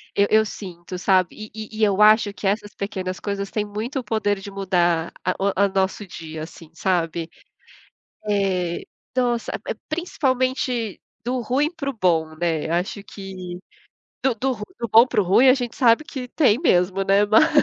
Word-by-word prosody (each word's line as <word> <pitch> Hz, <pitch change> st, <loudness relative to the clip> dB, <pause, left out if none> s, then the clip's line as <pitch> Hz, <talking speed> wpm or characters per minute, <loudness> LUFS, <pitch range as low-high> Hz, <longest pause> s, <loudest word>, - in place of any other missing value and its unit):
eu 200 Hz, 0 st, +4 dB
eu 220 Hz, 0 st, +5 dB
sinto, 180 Hz, -3 st, -8 dB
sabe, 185 Hz, -1 st, +2 dB
e 215 Hz, 0 st, -9 dB
e 220 Hz, 0 st, -8 dB
e -, -, +4 dB
eu 205 Hz, -1 st, +3 dB
acho 215 Hz, -1 st, +6 dB
que 200 Hz, -, -3 dB
essas 205 Hz, +1 st, -1 dB
pequenas 190 Hz, -2 st, -4 dB
coisas 200 Hz, -1 st, -4 dB
têm 210 Hz, -1 st, -1 dB
muito 220 Hz, +7 st, -4 dB
o -, -, -5 dB
poder 205 Hz, -3 st, 0 dB
de 195 Hz, -, -8 dB
mudar 175 Hz, -4 st, +1 dB
a -, -, +1 dB
o 195 Hz, -, +2 dB, 0.2 s
o -, -, +3 dB
nosso 190 Hz, +2 st, 0 dB
dia, 160 Hz, -3 st, -7 dB
assim, 160 Hz, 0 st, -11 dB
sabe. 165 Hz, -1 st, -1 dB, 1.0 s
É, 190 Hz, -4 st, 0 dB, 0.3 s
nossa! 240 Hz, -2 st, 0 dB
É -, -, -1 dB
é, -, -, -12 dB
principalmente 260 Hz, -, -1 dB, 0.2 s
do 250 Hz, +1 st, -1 dB
ruim 265 Hz, +6 st, +1 dB
para 280 Hz, -4 st, -3 dB
o -, -, -6 dB
bom, 165 Hz, -8 st, +1 dB
né. 165 Hz, -2 st, -1 dB
Acho 180 Hz, +4 st, -1 dB
que, 190 Hz, -3 st, -8 dB, 0.6 s
do 265 Hz, -2 st, +2 dB
do 265 Hz, +3 st, -1 dB
ru 215 Hz, -4 st, -6 dB
do 235 Hz, -, -3 dB
bom 225 Hz, +3 st, +7 dB
para 230 Hz, -, +1 dB
o -, -, +1 dB
ruim, 215 Hz, +9 st, +5 dB
a 255 Hz, -, +8 dB
gente 245 Hz, -3 st, -4 dB
sabe 240 Hz, +3 st, +4 dB
que 260 Hz, -4 st, -6 dB
tem 250 Hz, -5 st, +3 dB
mesmo, 185 Hz, -, +2 dB
né. 195 Hz, +1 st, +4 dB
Mas 220 Hz, +10 st, +5 dB
205 Hz, 185 wpm, -23 LUFS, 185-235 Hz, 1.0 s, a